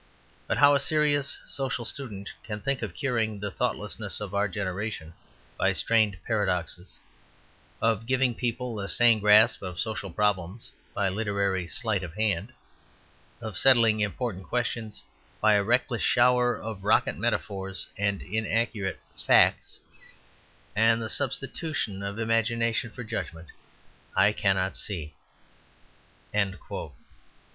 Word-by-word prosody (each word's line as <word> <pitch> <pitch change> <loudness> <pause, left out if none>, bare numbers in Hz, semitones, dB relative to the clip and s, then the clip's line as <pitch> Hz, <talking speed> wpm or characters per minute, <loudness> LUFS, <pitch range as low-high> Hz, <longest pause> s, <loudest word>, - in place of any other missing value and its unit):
But - - 0
how 145 0 +7
a 140 - +4
serious 145 -1 +2
social 130 -3 -2
student 105 -8 -5
can 105 -1 -5
think 135 +4 -1
of 100 -7 -5
curing 115 -5 -1
the 100 0 -4
thoughtlessness - - -2
of 105 -2 -6
our 100 +1 +2
generation 95 -3 -4 0.5
by - - +3
strained 110 -4 +2
paradoxes; 95 -4 -2 0.9
of 115 0 +1
giving 130 -1 +2
people 120 -1 -3
a 100 0 -4
sane 120 -2 +4
grasp 105 +1 +6
of 90 -3 -6
social 110 -3 -3
problems 100 +1 -1 0.2
by 100 - +1
literary 100 -2 -1
sleight 110 -1 -1
of 90 -2 -7
hand; 105 0 0 0.9
of 110 -4 -3
settling 115 -5 +6
important 105 -2 -2
questions 120 -3 -2 0.4
by 110 0 +5
a 100 -1 +3
reckless 120 +2 +1
shower 125 0 +4
of 110 -3 -6
rocket 105 - +3
metaphors 95 -2 -2
and 100 -1 -1
inaccurate 110 -2 -1 0.2
'facts,' - - +3 0.9
and 115 +1 +4
the 110 -1 -4
substitution 135 -5 -2
of 100 +1 -4
imagination 115 0 +1
for 125 - -8
judgment, 85 -7 -5 0.7
I 100 +2 +5
cannot 95 -2 0
see." 80 -7 -4
110 Hz, 120 wpm, -27 LUFS, 100-120 Hz, 0.9 s, how